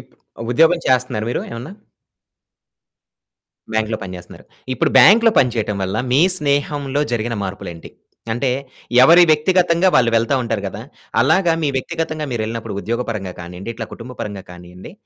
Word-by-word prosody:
ఇప్పుడు 115 - -14
ఉద్యోగం 165 +5 +4
చేస్తున్నారా 125 -4 +1
మీరు - - -1
ఏమన్నా? 120 +9 -7 2.0
బ్యాంక్‌లో 110 0 -1
పని 90 -1 -7
చేస్తున్నారు. 90 - -13 0.3
ఇప్పుడు - - 0
బ్యాంక్‌లో 225 +3 +7
పని 125 -3 +3
చేయటం 105 -2 -1
వల్ల 95 +3 -2
మీ 140 +5 +4 0.2
స్నేహంలో 145 -1 -1
జరిగిన 115 0 -2
మార్పులు 95 -1 -6
ఏంటి? 85 - -12 0.4
అంటే 125 +2 -1 0.5
ఎవరి 170 +5 +7
వ్యక్తిగతంగా 175 +3 +2
వాళ్ళు 120 -3 +4
వెళ్తా 115 +5 +2
ఉంటారు 115 -3 -2
కదా! - - -7 0.4
అలాగా 165 +5 +3
మీ - - +1
వ్యక్తిగతంగా 160 +1 -3
మీరెళ్ళినప్పుడు, 115 -2 -4
ఉద్యోగ 120 +2 -2
పరంగా 95 -5 -4
కానియండి, 90 +5 -8
ఇట్లా 110 -1 -6
కుటుంబ 125 +2 -9
పరంగా 100 -2 -6
కానియండి. 90 +1 -12
120 Hz, 145 wpm, -19 LUFS, 105-150 Hz, 2.0 s, బ్యాంక్‌లో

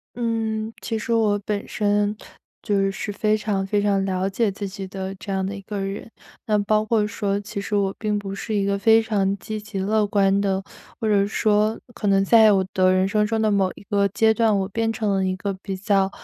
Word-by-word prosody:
嗯， 225 -2 -2
其 225 -1 -3
实 230 +2 -3
我 215 -3 +2
本 205 -1 -3
身， 205 0 0 0.5
就 195 -2 +1
是 205 +1 -5
非 215 +1 +1
常 205 -2 -1
非 205 +1 +1
常 200 -1 +1
了 190 0 -1
解 210 +2 0
自 200 +1 -5
己 195 0 -6
的， 190 0 -5
这 200 - -9
样 190 -1 -1
的 195 +2 -3
一 200 - -7
个 205 +1 -6
人。 195 +3 -5 0.4
那 210 -2 +2
包 215 +1 +1
括 215 -1 +1
说， 205 -2 -2
其 205 0 -6
实 205 +1 -2
我 195 -1 0
并 210 -1 -1
不 195 -1 -5
是 215 +2 -4
一 200 -1 +1
个 200 0 0
非 225 +2 +5
常 200 -3 0
积 215 +1 -6
极 210 -1 -7
乐 210 +2 +1
观 200 -1 +2
的， 195 -1 0 0.4
或 225 - -1
者 200 -2 +3
说 215 +1 +1 0.2
可 215 - -4
能 195 0 +3
在 220 +1 +6
我 190 -2 +2
的 185 0 +3
人 185 0 +2
生 210 +1 +1
中 220 +1 -1
的 215 -1 +2
某 195 -2 +2
一 - - -13
个 200 -1 +2
阶 220 +3 +3
段， 220 -2 +2
我 190 - -1
变 225 +3 -1
成 215 -2 -1
了 190 -1 +1
一 185 0 -1
个 200 +1 -3
比 195 -2 -4
较， 195 -1 +1
205 Hz, 250 characters per minute, -23 LUFS, 195-215 Hz, 0.5 s, 在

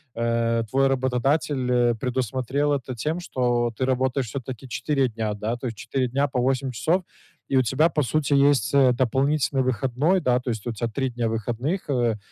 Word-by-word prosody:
э, 115 0 +1
твой 135 +3 +3
работодатель, 130 +1 0
э, 120 -1 +3
предусмотрел 130 +4 -1
это 130 -2 -3
тем, 160 +3 -1
что 120 -7 0
ты 130 - 0
работаешь 130 0 0
всё-таки 130 -1 -6
4 135 +2 0
дня, 110 -1 -2
да? 105 +3 -3
То 125 - -5
есть 115 -3 -6
4 130 +4 -1
дня 140 +3 +1
по 130 -2 -2
8 130 +1 0
часов, 165 - 0 0.5
и 135 - +3
у 130 - +4
тебя, 135 +7 +2
по 150 -3 0
сути, 145 +2 0 0.2
есть, 140 -5 +1
э, 135 -2 +6
дополнительный 135 +2 +1
выходной, 130 +8 +1
да? 125 -4 +2
То 125 - -5
есть 110 -1 -4
у 120 - -2
тя 115 +2 -2
3 130 +4 -2
дня 120 -1 -2
выходных, 120 - -3
э, - - +1
вэ 120 -4 +1
130 Hz, 195 wpm, -24 LUFS, 120-135 Hz, 0.5 s, э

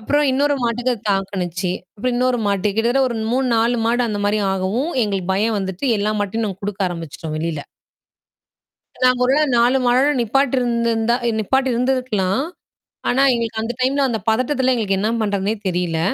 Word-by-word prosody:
அப்புறம் 290 +6 +1
இன்னொரு 285 +2 +2
மாட்டுக்கு 245 +2 0 0.2
தாக்குச்சி. 185 -2 -2 0.3
அப்புறம் 250 +3 -1
இன்னொரு 250 0 +1
மாட்டுக்கு 200 +1 0
கிட்டத்தட்ட 240 +4 +2
ஒரு 235 - -4 0.2
3 260 +1 +1
4 235 +2 +2
மாடு 240 +2 +2
அந்த 205 -2 -2
மாரி 210 +1 +1
ஆகவும். 200 - -1
எங்களுக்கு 195 -3 -2
பயம் 215 +2 +1
வந்துட்டு 190 +5 -3
எல்லா 210 +1 0
மாட்டையும் 215 +2 -1
நாங்க 195 0 -6
குடுக்க 200 -1 -2
ஆரம்பிச்சுட்டோம் 165 -2 -6
வெளில. 160 -2 -3 1.4
நாங்க 255 0 +4
ஒருவேள 275 +4 +3
4 245 +3 +4
மாடோட 260 +3 +3
நிப்பாட்டு 270 +4 +1
இருந்துருந்தா 235 -1 +1 0.2
நிப்பாட்டி 265 +5 +1
இருந்திருக்கலாம். 245 -5 0 0.7
ஆனா, 260 +3 +3
எங்களுக்கு 230 -2 -2
அந்த 225 +2 -2
டைம்ல 275 +2 +2
அந்த 230 -3 -1
பதட்டத்துல 255 +3 +2
எங்களுக்கு 200 -5 0
என்ன 210 +3 0
பண்றதுன்னே 205 0 0
தெரியல. 175 -2 -1
225 Hz, 155 wpm, -20 LUFS, 195-255 Hz, 1.4 s, நாங்க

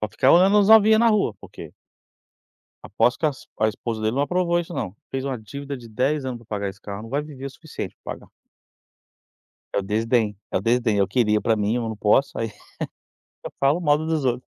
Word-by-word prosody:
Pra 110 - -2
ficar 130 - +3
olhando 190 +4 +6
as 200 - +4
novinha 220 0 +7
na 235 0 +5
rua, 210 - +2
porque - - -11 1.1
Aposto 120 - +1
que 160 - +2
as 145 -3 -4
a 110 - +4
esposa 110 +1 -4
dele 110 +3 0
não 140 - +2
aprovou 175 +2 +1
isso, 175 0 -5
não, 95 -5 -4
fez 135 0 -4
uma 135 -3 -2
dívida 140 +6 -7
de 120 -2 -12
10 130 +6 0
anos 125 -2 -4
pra 115 - -19
pagar 100 -3 -3
esse 95 0 -10
carro, 100 +1 -7
não 115 - -10
vai 140 +3 0
viver 145 -3 -10
o - - -6
suficiente 160 +3 -8
pra - - -5
pagar. - - -16 1.5
É - - +2
o - - 0
desdém, 110 +1 0
é - - +1
o - - -4
desdém, 115 0 +1
eu 100 - +2
queria 105 -4 +2
pra 115 -1 +1
mim, 105 +3 0
eu 120 - -1
não 110 - -5
posso, 105 +6 +2
aí 115 -1 -3 0.9
eu - - -6
falo 140 +5 +3
mal 150 -4 +3
dos 160 -2 -1
outros. 125 0 0
125 Hz, 220 wpm, -23 LUFS, 110-150 Hz, 1.5 s, novinha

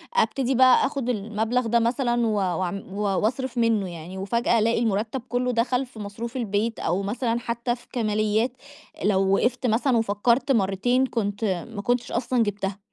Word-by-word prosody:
ابتدي 270 - +1
بقى 255 +1 +6
آخد 270 -3 -2
المبلغ 225 +2 -1
ده 235 +1 +3
مثلًا 240 0 +1
و 215 - +1
وأعم 185 0 -1
و 205 - -3
وأصرف 235 +6 -1
منه 225 -5 +2
يعني، 170 +3 -8
وفجأة 235 +4 +1
ألاقي 230 +1 +2
المرتب 225 +3 -1
كلّه 250 0 0
دخل 245 +2 +1
في 240 -3 -14
مصروف 225 +5 -6
البيت 225 0 -1
أو 175 +4 0
مثلًا 230 +3 -1
حتى 235 0 -2
في 245 - -20
كماليات 215 +1 +1 0.5
لو 195 -1 +2
وقفْت 250 +2 0
مثلًا 235 +3 +2
وفكرت 225 +5 +1
مَرّتين 235 +4 +2
كنت 215 -3 -2 0.3
ما 200 - -3
كنتش 245 +2 -1
أصلًا 240 0 +1
جبتها. 200 -1 -3
230 Hz, 160 wpm, -24 LUFS, 205-245 Hz, 0.5 s, بقى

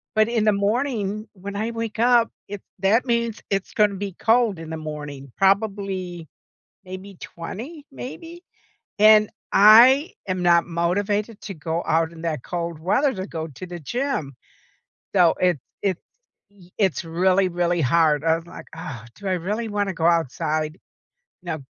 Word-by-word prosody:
but 215 0 +4
in 230 -2 0
the 215 - +5
morning, 215 0 -1
when 200 0 -8
I 215 +3 -1
wake 230 -1 -5
up, 240 -1 +4 0.2
it 200 -1 -7 0.2
that 205 +7 +3
means 235 -3 -1
it's 195 -1 -1
gonna 210 -2 +3
be 195 0 -5
cold 225 0 +2
in 165 -1 -8
the 160 - -4
morning, 145 -3 -7
probably 195 -4 0 0.6
maybe 185 +1 -9
20, 255 - -8
maybe, 330 +7 -9 0.6
and 215 0 +7 0.2
I 240 - +7
am 185 -1 -1
not 170 -1 +4
motivated 200 +6 -1
to 200 - -6
go 160 +1 -3
out 165 +1 +1
in 165 - -11
that 155 -6 -3
cold 170 -2 -4
weather 255 - +1
to 190 -1 -5
go 160 -4 -5
to 150 +5 -9
the 175 -1 -8
gym. 200 - -3 0.8
So 175 -3 +5
it's 180 -5 +2 0.2
it's 190 -3 -1 0.8
it's 190 -2 +1
really, 185 +3 +2
really 175 -1 0
hard, 150 +1 +3
I 165 0 +3
was 165 0 -7
like, - - -11
"Ugh. 125 -8 -8
Do 200 - -8
I 190 - +1
really 205 +6 -2
wanna 205 -2 -1
go 165 -2 -2
outside?" 155 -1 0 0.6
Now 165 -4 -4
190 Hz, 155 wpm, -23 LUFS, 165-215 Hz, 0.8 s, and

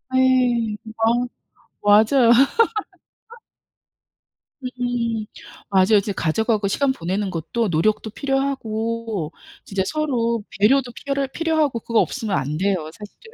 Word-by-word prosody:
예. 250 -4 +2 0.2
어 235 +2 +2 0.5
맞아요. 220 +4 +5 2.3
음 245 -3 -2 0.4
맞아요. 195 +2 +4
이제 205 +1 -3
가족하고 205 +4 0
시간 270 +7 +1
보내는 190 -1 -2
것도 190 +6 -2
노력도 215 +7 +1
필요하고 230 - -2 0.3
진짜 195 -1 -2
서로 235 -6 -1 0.2
배려도 245 +3 +3
피럴 275 -1 -2
필요하고 315 -6 0
그거 230 0 0
없으면 220 -6 -2
안 145 +3 -2
돼요 185 -4 -1
사실은. 215 - -14
230 Hz, 240 characters per minute, -21 LUFS, 205-255 Hz, 2.3 s, 맞아요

